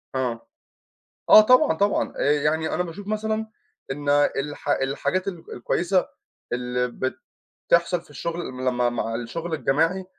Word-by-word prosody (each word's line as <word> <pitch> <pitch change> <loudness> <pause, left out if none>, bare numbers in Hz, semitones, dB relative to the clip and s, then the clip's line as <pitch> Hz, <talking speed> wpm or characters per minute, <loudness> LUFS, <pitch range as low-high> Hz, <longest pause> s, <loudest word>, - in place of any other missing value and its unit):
آه. 125 -3 -2 0.8
آه، - - +10
طبعًا، 215 -6 +5
طبعًا. 200 +4 +1
آآ، 145 - +3
يعني 150 +2 0
أنا 180 - +1
باشوف 180 +4 -8
مثلًا 215 +1 -2 0.5
إن 145 +1 -6 0.3
الحا 145 0 -2
الحاجات 165 +8 -1
الك 170 -3 -7
الكويّسة 180 +9 0 0.4
اللي 125 0 -1
بت 130 +2 -4 0.5
تحصل 170 +1 +3
في 160 - -23
الشغل 170 +4 -4
لما 125 -1 0
مع 115 -1 -3
الشغل 160 +9 -4
الجماعي 165 +6 +1
160 Hz, 135 wpm, -24 LUFS, 130-180 Hz, 0.8 s, آه